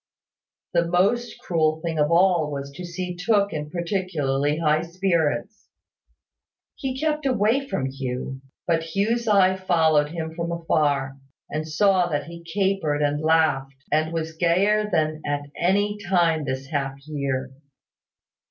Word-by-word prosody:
The 170 -1 +2
most 200 +8 +1
cruel 160 -2 0
thing 160 -2 -2
of 150 0 +3
all 170 -3 +4
was 140 -1 -5
to 160 +6 -9
see 180 +1 -5
Tooke 200 +1 +1
in 150 -1 -4
particularly 155 -5 -1
high 155 -1 +2
spirits. 170 +3 -1 1.1
He 265 -1 -4
kept 305 -1 0
away 250 +3 +2
from 195 - -2
Hugh; 130 0 -4 0.2
but 165 0 -1
Hugh's 230 +4 +1
eye 190 -3 +5
followed 160 -5 +2
him 160 0 -5
from 170 +1 -3
afar, 145 -5 0 0.3
and 155 +1 -3
saw 185 +3 +3
that 145 -2 -1
he 170 +2 -10
capered 170 -4 0
and 145 +1 0
laughed, 155 -4 +2 0.2
and 155 +2 +2
was 160 -1 -3
gayer 200 +6 +2
than 155 -3 0
at 145 0 -1
any 205 +4 +1
time 165 -5 +2
this 130 0 -3
half 135 -2 -1
year. 135 -3 -3
165 Hz, 140 wpm, -24 LUFS, 150-190 Hz, 1.1 s, eye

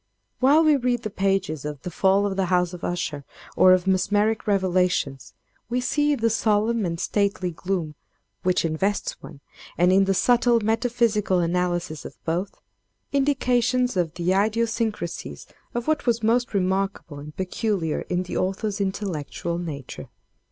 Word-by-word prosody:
While 285 +5 +5
we 305 -2 +5
read 245 -2 -1
the 215 - -4
pages 195 -7 -1
of 150 -2 -6
the 180 - -5
'Fall 195 +4 +3
of 200 -1 -1
the 190 -1 0
House 180 0 +1
of 175 - -9
Usher,' 160 -5 -3 0.3
or 185 - +6
of 185 -1 +4
'Mesmeric 205 +4 +1
Revelations,' 180 -8 0 0.3
we 245 +1 0
see 295 +4 +1
in 280 - -2
the 230 - +3
solemn 220 -1 +1
and 170 -1 -4
stately 200 -2 0
gloom 170 -2 -3 0.5
which 185 -2 +1
invests 190 +6 -1
one, 140 - -12 0.4
and 180 +2 +4
in 195 +1 +5
the 195 0 +1
subtle 240 +2 +3
metaphysical 225 -3 +1
analysis 175 -3 -1
of - - -10
both, 175 +4 -2 0.5
indications 250 -3 +1
of 175 -3 -1
the 175 +1 0
idiosyncrasies 220 -2 -1 0.3
of 240 0 -3
what 310 -4 0
was 235 -1 +1
most 230 0 +1
remarkable 190 -5 -1
and 150 +1 -11
peculiar 190 -3 -1
in 180 0 0
the 180 - -6
author's 195 +2 -2
intellectual 175 -3 -3
nature. 145 -6 -7
195 Hz, 150 wpm, -24 LUFS, 175-230 Hz, 0.5 s, or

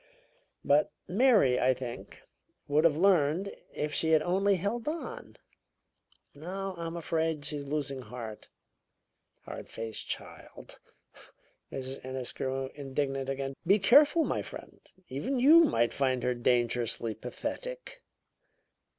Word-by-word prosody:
But 145 +2 +4 0.2
Mary, 200 - +4
I 130 0 +3
think, 120 -2 -8 0.4
would 150 +3 +3
have 155 -3 +4
learned 180 0 +2 0.2
if 150 0 -3
she 160 +1 +1
had 155 -1 +5
only 195 +3 +2
held 205 - -3
on. 320 +2 -5 1.0
Now, 190 +6 -5
I'm 170 0 -5
afraid, 160 -2 -1
she's 145 -1 -3
losing 140 -2 -2
heart. 115 -2 -8 0.9
Hard - - -8
faced 110 -1 -5
child!" - - -8 0.9
Mrs. 135 0 -6
Ennis 130 -1 -4
grew 135 0 -3
indignant 135 -1 -3
again. 135 0 -3
"Be 200 +3 +6
careful 290 - +6
my - - -1
friend; - - -10 0.3
even 230 - -2
you 320 +6 +8
might 120 - +1
find 130 -2 0
her 125 - +1
dangerously 120 -2 0
pathetic." - - -6
145 Hz, 120 wpm, -30 LUFS, 130-195 Hz, 1.0 s, you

